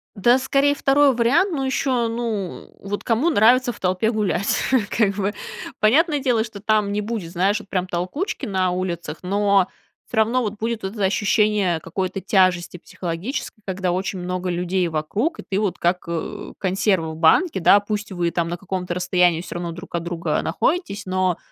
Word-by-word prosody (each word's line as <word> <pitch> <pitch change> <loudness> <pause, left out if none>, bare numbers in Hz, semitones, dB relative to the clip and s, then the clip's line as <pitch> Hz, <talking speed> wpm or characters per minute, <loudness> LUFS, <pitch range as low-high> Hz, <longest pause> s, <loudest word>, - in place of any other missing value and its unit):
Да, 240 +6 +4
скорее, 275 +2 +2
2 275 0 +4
вариант. 285 +12 +3
Но 270 -4 -1
еще, 255 -3 0
ну, 225 -5 -4
вот 205 +1 -5
кому 240 +9 +2
нравится 245 +1 +4
в - - -13
толпе 185 +5 +1
гулять, 200 -3 0 0.3
как 200 -4 +1
бы? 205 +1 -1 0.5
Понятное 295 +7 +3
дело, 245 -5 +1
что 215 -3 -9
там 215 -2 +1
не 210 +1 -1
будет, 205 -6 -4
знаешь, 195 +4 +1
вот 205 - -14
прям 185 -1 -1
толкучки 185 - -3
на 185 -3 0
улицах, 175 -4 -3
но 200 0 +2 0.4
всё 230 - -6
равно 230 +4 +3
вот 210 -3 -2
будет 225 -1 -2
это 200 +1 -3
ощущение 205 -3 +2
какой-то 185 +4 -3
тяжести 185 -2 +2
психологической, 185 - -5
когда 185 -2 -1
очень 190 +1 -2
много 180 0 -3
людей 180 +1 0
вокруг, 200 - -2
и - - -6
ты 195 +1 0
вот 205 -4 -1
как, 180 +1 0
э, 170 -1 -5
консерва 190 -3 0
в - - -7
банке. 190 - +4
Да, 200 +4 +6
пусть 205 0 -4
вы 175 -2 -1
там 170 -1 -1
на 175 - -3
каком-то 180 -1 -4
расстоянии 180 -2 +2
всё 180 - -8
равно 175 -1 -3
друг 175 +3 -10
от 170 -1 -2
друга 170 -1 -1
находитесь, 340 - -1
но 185 -1 0
195 Hz, 180 wpm, -22 LUFS, 180-225 Hz, 0.5 s, Да